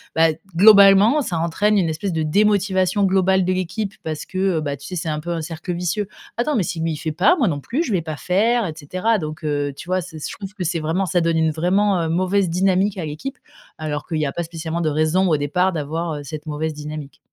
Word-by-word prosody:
bah, 160 0 +5
d 155 - -10 0.2
globalement 200 - +7
ça 175 -8 -2
entraîne 205 +6 +2
une 170 -4 +1
espèce 170 +4 -3
de 160 - -1
démotivation 195 +2 +2
globale 190 -1 +3
de 185 - +1
l'équipe 190 +3 -3
parce 155 -1 -5
que, 185 - -7 0.2
heu, - - 0
bah, 140 -2 -3
tu 140 - -13
sais 185 - -6
c'est 165 -1 -3
un 150 -1 -2
peu 170 +3 -5
un 170 -1 -2
cercle 165 +3 -5
vicieux: 180 +4 -2 0.3
«Attends, 285 +5 0
mais 220 - +2
si 170 -1 -3
lui 165 0 0
il 155 - -4
fait 155 - -3
pas 180 - +4
moi 270 - +1
non 145 -5 -1
plus, 255 - -2
je 255 - -4
vais 180 -5 0
pas 155 -2 -5
faire» 215 +8 +1
et 160 - -5
cetera. 185 +9 0
Donc, 155 -2 -6
heu, 145 -2 -1
tu 175 - -10
vois? 185 0 +1
C'est 175 -2 -9
s 150 - -5
je - - -7
trouve 195 0 -8
que 200 -3 -5
c'est 170 0 -1
vraiment 165 +5 -1
ça 175 +1 +2
donne 165 0 +1
une 160 0 +3
vraiment, 185 +5 +1
heu, 160 - -2
mauvaise 185 +3 +1
dynamique 190 +3 +1
à 165 - -3
l'équipe, 155 - -6 0.4
alors 150 -2 -3
qu'il 160 -2 -2
y 150 - 0
a - - -3
pas 175 - -3
spécialement 165 0 -4
de 155 - +1
raison 155 +5 +2
au 155 - +3
départ 180 +6 +1
d'avoir, 160 +1 -3
heu, - - -8
cette 150 +2 -7
mauvaise 155 +1 -3
dynamique. 150 -1 -8
170 Hz, 260 wpm, -21 LUFS, 155-195 Hz, 0.4 s, globalement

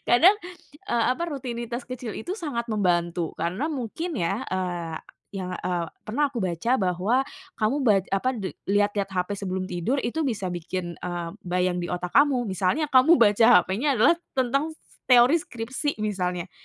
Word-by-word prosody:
kadang, 355 +12 +6 0.5
eee, 235 -1 +2
apa, 295 - -5
rutinitas 240 -5 -4
kecil 250 -3 -6
itu 360 - -4
sangat 245 - -3
membantu. 175 -4 0
Karena 185 - -2
mungkin 310 +3 -4
ya, 195 +5 -1
eee, 175 -3 -3 0.4
yang, 185 -2 -4
eee, 175 -2 -2 0.2
pernah 280 +6 0
aku 255 - -5
baca 185 +3 -2
bahwa, 195 +8 +1 0.3
kamu 220 +5 +1
ba 220 -5 +5 0.2
apa, 195 +6 +1
de 195 -3 -5 0.2
lihat-lihat 205 -1 +1
hape 185 +2 -1
sebelum 190 -1 -3
tidur 180 +9 -1
itu 320 +7 -2
bisa 220 -9 -2
bikin, 175 0 -4
eee, 175 -1 -3
bayang 180 0 0
di 175 - -4
otak 180 0 -4
kamu. 275 -4 +4
Misalnya, 195 - 0
kamu 275 +4 +6
baca 225 0 +5 0.2
hapenya 250 +7 0
adalah 250 +10 +6 0.2
tentang, 275 +5 +1 0.4
teori 250 +5 +6
skripsi 250 -2 -4
misalnya. 180 -4 -2
215 Hz, 155 wpm, -25 LUFS, 180-255 Hz, 0.5 s, kadang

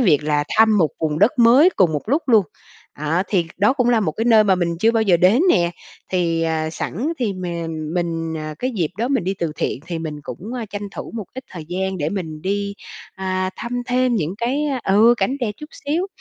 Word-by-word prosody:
việc 155 - +3
là 150 -1 +1
thăm 220 -1 +5
một 160 -5 +3
vùng 155 -1 -1
đất 240 +8 +3
mới 250 +9 +7
cùng 180 -4 +4
một 150 - -2
lúc 290 +7 +2
luôn. 220 -5 +5 0.5
À, 155 +4 0
thì 180 -5 +1
đó 205 +4 +3
cũng 250 -3 +1
là 235 -2 +4
một 170 -7 0
cái 225 - -2
nơi 225 -2 +6
mà 195 -2 +4
mình 170 -2 -1
chưa 220 +6 +4
bao 225 -1 +2
giờ 190 -5 +4
đến 190 - +4
nè, 170 - +3 0.4
thì, 170 -3 +1
ờ, 160 -1 -1
sẵn 235 - -3
thì 230 -6 0
m 185 -1 -8 0.5
mình, 165 -2 -2
à, 155 0 -5
cái 255 - -1
dịp 170 -5 0
đó 235 +3 0
mình 265 -9 0
đi 190 +2 -1
từ 170 -4 -3
thiện - - -2
thì 170 -1 -4
mình 155 -2 -5
cũng - - -7 0.3
tranh 205 0 -5
thủ - - -8
một 220 -3 -4
ít 260 0 -7
thời 170 -4 -8
gian 190 +1 -2
để 150 -1 -1
mình 160 -5 -5
đi, 200 +1 -2 0.4
à, 185 -1 -2
thăm 245 +1 -4
thêm 250 0 +2
những 175 -4 -1
cái 250 +5 0 0.2
ừ, 215 +5 +5
cảnh 265 +3 0
đẹp 220 -4 -1
chút 300 0 -10
xíu. 315 +6 -2
190 Hz, 230 wpm, -21 LUFS, 165-235 Hz, 0.5 s, mới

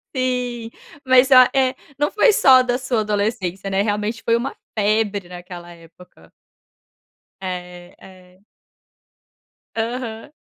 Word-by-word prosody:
Sim. 250 -2 -2 0.4
Mas, 260 0 +5
oh, 255 -1 +8
eh, 260 0 +2 0.2
não 295 +1 0
foi 430 +1 +4
só 260 -8 +6
da 245 -1 -1
sua 255 -3 -1
adolescência, 200 -3 -2
né? 195 0 +1
Realmente 210 +2 -2
foi 230 - +2
uma 245 +4 -3 0.2
febre 205 -3 0
naquela 175 -1 -10
época. 165 - -19 1.1
É, 180 -1 -7
é. 185 0 -18 1.3
Aham. 230 +1 -4
215 Hz, 115 wpm, -20 LUFS, 185-250 Hz, 1.3 s, oh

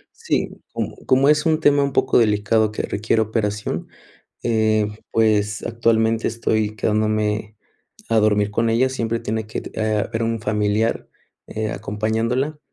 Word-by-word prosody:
Sí, - - -1 0.2
como - - -4
como 135 +2 +4
es 150 +1 +3
un 155 0 +2
tema 145 -2 +4
un 140 - -1
poco 130 -1 +3
delicado 105 0 +2
que - - -4
requiere 110 +2 0
operación, 105 -1 -2 0.6
eh, 110 -2 +2 0.2
pues, 110 -1 +1
actualmente 115 -1 +1
estoy 110 -2 0
quedándome 105 0 0 0.5
a 115 -1 +3
dormir 105 -1 +2
con 115 +2 +1
ella. 125 +3 +3
Siempre 115 -3 -2
tiene 110 0 -3
que 110 - -4
t - - -9
eh, 110 -1 +1
haber 110 +3 -2
un 115 -1 -1
familiar, 105 +1 0 0.4
eh, 110 0 -3
acompañándola, 115 +8 -2
110 Hz, 145 wpm, -21 LUFS, 105-115 Hz, 0.6 s, como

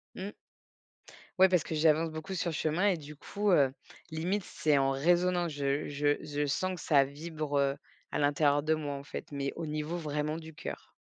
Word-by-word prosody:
Mmh. 190 +2 -4 1.1
Ouais 190 - +9
parce 180 -4 +2
que - - -5
j'avance 160 +1 +3
beaucoup 160 +5 -5
sur 175 -1 -1
le - - -3
chemin 160 +5 +1
et 185 - +1
du 150 -1 -10
coup, 205 +7 -1
heu, 140 -6 +5 0.4
limite 180 +6 -1
c'est 150 -4 +1
en 135 0 +3
résonance, 175 +3 +2
je 140 +1 -1
je 145 0 +1
je 150 -1 -2
sens 185 +6 -1
que 175 - -9
ça 140 -3 +4
vibre 145 -1 -1 0.3
à - - -1
l'intérieur 145 0 +3
de 155 +2 +2
moi 150 -2 -3
en 140 - -7
fait, - - -6
mais 140 -1 -2
au 165 - -4
niveau 155 +2 -3
vraiment 150 -1 -2
du 160 -1 -8
cœur. - - -8
155 Hz, 195 wpm, -31 LUFS, 145-170 Hz, 1.1 s, Ouais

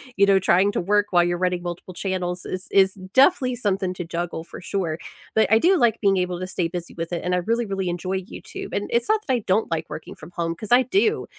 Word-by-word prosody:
you 200 - +5
know, 195 -1 +4
trying 190 +2 +3
to - - -1
work 205 +3 +2
while 175 -2 +5
you're 175 0 0
running 180 0 0
multiple 175 +1 -6
channels 180 -1 -3
is 185 +1 -5
is 190 -1 +4 0.2
definitely 265 -2 +4
something 195 -5 -1
to 175 - -5
juggle, 170 -1 -4
for 170 - -11
sure. 175 -4 -2 0.4
But 220 -1 +3
I 220 - +7
do 365 +8 +4
like 235 -6 +2
being 195 -2 +3
able 180 -1 -1
to 185 - -4
stay 185 -3 -1
busy 175 0 -6
with 165 0 -5
it, 170 - -3
and 180 - -1
I 180 - +2
really, 230 +6 0
really 195 -3 -2
enjoy 185 +2 -2
YouTube. 185 - -9
And - - -2
it's 470 - +1
not 435 0 +3
that 265 - +2
I 245 - +2
don't 200 +4 +2
like 165 -1 -2
working 160 - -8
from 155 +3 -13
home, 165 -1 -2
'cause 210 +4 -8
I 250 +2 +7
do; 400 - +1
190 Hz, 255 wpm, -23 LUFS, 175-220 Hz, 0.4 s, I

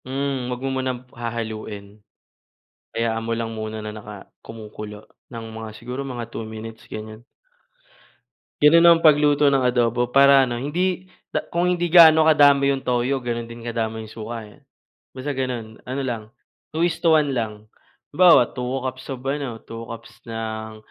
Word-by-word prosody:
Mm, 135 -1 -2
huwag 125 0 -4
mo - - 0
munang 130 -1 -4
hahaluin. 110 -3 -6 0.9
Hayaan 115 -1 -1
mo 115 - 0
lang 115 0 -3
muna 110 0 -5
na 105 - -5
naka 105 -2 -10
kumukulo 105 -1 -9 0.2
ng 115 -2 -8
mga 110 -1 -8
siguro 125 +5 -6
mga 120 -3 -6
2 115 -1 -6
minutes, 110 0 -9
ganyan. 110 +2 -9 1.4
Ganun 165 +3 +7
ang 170 -1 +7
pagluto 150 -2 +5
ng 135 -2 +2
adobo 120 0 +1
para 140 -1 +7
ano, 120 -1 -4
hindi 180 +5 -1 0.2
da - - +1
kung 175 0 0
hindi 175 0 -1
gaano 160 -2 +8
kadami 140 -2 +5
'yong 135 -1 -1
toyo, 125 +2 +1
gano'n 120 -2 -4
din 115 0 -10
kadami 110 -1 -3
yung 110 - -13
suka, 115 0 -6
eh. - - -23 0.6
Basta 140 +3 -3
gano'n, 125 -4 -4
ano 130 +2 -4
lang 115 -4 -3 0.5
2 165 +2 0
is 175 - 0
to 165 -2 +5
1 145 -3 +1
lang. 110 -3 -4 0.5
Halimbawa, 170 -7 +6
2 125 -1 -4 0.2
cups 130 +1 -6
of 130 -1 -6
ano, 135 -4 -3
2 115 0 -8
cups 115 - -9 0.2
ng 110 -1 -5
120 Hz, 165 wpm, -22 LUFS, 110-140 Hz, 1.4 s, gaano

